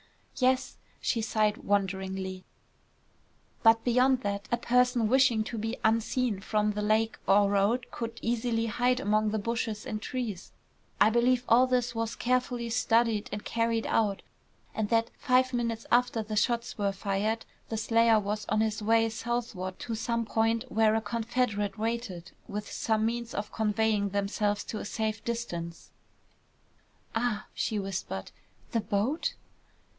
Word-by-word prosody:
"Yes." 255 Hz, 0 st, +1 dB, 0.2 s
She 230 Hz, -, 0 dB
sighed 215 Hz, -1 st, +1 dB
wonderingly. 190 Hz, -4 st, -2 dB, 1.2 s
"But 225 Hz, -1 st, +5 dB
beyond 250 Hz, +1 st, +3 dB
that, 200 Hz, -1 st, -3 dB
a 240 Hz, -, +3 dB
person 250 Hz, -1 st, +2 dB
wishing 250 Hz, -2 st, +4 dB
to 225 Hz, +1 st, -5 dB
be 225 Hz, +2 st, -3 dB
unseen 225 Hz, 0 st, +1 dB
from 210 Hz, +1 st, 0 dB
the 210 Hz, 0 st, -3 dB
lake 220 Hz, +2 st, +1 dB
or 200 Hz, 0 st, +5 dB
road 210 Hz, +6 st, +1 dB
could 230 Hz, -1 st, -5 dB
easily 230 Hz, 0 st, 0 dB
hide 245 Hz, +3 st, +1 dB
among 215 Hz, 0 st, +2 dB
the 220 Hz, -, -1 dB
brush 230 Hz, +3 st, -1 dB
and 215 Hz, 0 st, -5 dB
trees. 220 Hz, -7 st, -4 dB, 0.5 s
I 210 Hz, +2 st, +6 dB
believe 240 Hz, +2 st, +3 dB
all 250 Hz, +3 st, +6 dB
this 250 Hz, -1 st, +1 dB
was 230 Hz, 0 st, -2 dB
carefully 245 Hz, -1 st, 0 dB
studied 230 Hz, -2 st, +2 dB
and 205 Hz, 0 st, -5 dB
carried 230 Hz, -1 st, 0 dB
out, 205 Hz, -3 st, +1 dB, 0.5 s
and 215 Hz, -2 st, -2 dB
that, 230 Hz, 0 st, +2 dB
five 255 Hz, -1 st, +3 dB
minutes 230 Hz, -2 st, -2 dB
after 240 Hz, -2 st, +3 dB
the 215 Hz, 0 st, -5 dB
shots 235 Hz, +2 st, 0 dB
were 200 Hz, -1 st, +1 dB
fired, 200 Hz, +3 st, -1 dB, 0.2 s
the 225 Hz, -, -2 dB
slayer 230 Hz, 0 st, +4 dB
was 210 Hz, +1 st, -3 dB
on 215 Hz, -, +2 dB
his 220 Hz, -1 st, -1 dB
way 225 Hz, +1 st, +3 dB
southward 225 Hz, -5 st, -3 dB
to 230 Hz, -, -4 dB
some 230 Hz, +1 st, -1 dB
point 225 Hz, +1 st, +1 dB
where 220 Hz, 0 st, +3 dB
a 225 Hz, -, +1 dB
confederate 225 Hz, -1 st, -1 dB
waited, 220 Hz, -6 st, -3 dB, 0.2 s
with 210 Hz, -1 st, -5 dB
some 220 Hz, -1 st, 0 dB
means 235 Hz, +1 st, -3 dB
of 205 Hz, -, -3 dB
conveying 215 Hz, -1 st, +1 dB
themselves 205 Hz, +1 st, -1 dB
to 215 Hz, -, -5 dB
a -, -, -6 dB
safe 220 Hz, 0 st, -2 dB
distance." 175 Hz, -8 st, -5 dB, 1.2 s
"Ah!" 225 Hz, -2 st, -1 dB
she 220 Hz, -, -1 dB
whispered. 190 Hz, -, -4 dB, 0.4 s
"The 230 Hz, -, +1 dB
boat?" 215 Hz, +10 st, -1 dB
225 Hz, 150 wpm, -29 LUFS, 210-235 Hz, 1.2 s, I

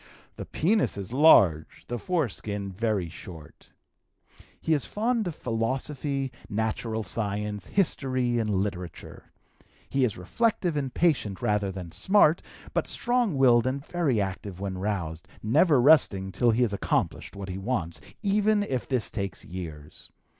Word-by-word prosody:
The -, -, -7 dB
penis 200 Hz, -, +1 dB
is 100 Hz, +3 st, -6 dB
large, 95 Hz, -, +5 dB
the 120 Hz, -1 st, -4 dB
foreskin 105 Hz, -, -2 dB
very 105 Hz, -2 st, -1 dB
short. 80 Hz, -1 st, -12 dB, 0.9 s
He 160 Hz, -, +1 dB
is 145 Hz, -, +1 dB
fond 225 Hz, 0 st, -1 dB
of 170 Hz, -, -4 dB
philosophy, 135 Hz, +4 st, -2 dB, 0.2 s
natural 110 Hz, +1 st, -2 dB
science, 105 Hz, 0 st, -3 dB
history, 130 Hz, -10 st, +1 dB
and 110 Hz, -2 st, -1 dB
literature. 95 Hz, -3 st, -4 dB, 0.6 s
He 135 Hz, -1 st, +1 dB
is 115 Hz, -5 st, 0 dB
reflective 180 Hz, -, 0 dB
and 135 Hz, -3 st, -2 dB
patient 130 Hz, -, +1 dB
rather 105 Hz, -2 st, 0 dB
than 90 Hz, -3 st, -7 dB
smart, 165 Hz, -, +4 dB, 0.3 s
but -, -, 0 dB
strong 240 Hz, -, 0 dB
willed 125 Hz, -2 st, +5 dB
and 135 Hz, +2 st, -2 dB
very 160 Hz, -11 st, 0 dB
active 95 Hz, -1 st, -4 dB
when 95 Hz, -2 st, -4 dB
roused, 95 Hz, -4 st, -3 dB, 0.2 s
never 145 Hz, +6 st, +4 dB
resting 120 Hz, -9 st, +4 dB
till 120 Hz, +5 st, +2 dB
he 115 Hz, +2 st, +3 dB
has 110 Hz, -4 st, 0 dB
accomplished 100 Hz, -, -1 dB
what 100 Hz, -1 st, -6 dB
he 95 Hz, +1 st, -4 dB
wants, 95 Hz, -6 st, -3 dB, 0.2 s
even 205 Hz, +1 st, +2 dB
if 130 Hz, -11 st, -3 dB
this 130 Hz, -5 st, 0 dB
takes 100 Hz, -3 st, -4 dB
years. 80 Hz, -5 st, -9 dB
115 Hz, 140 wpm, -27 LUFS, 95-145 Hz, 0.9 s, large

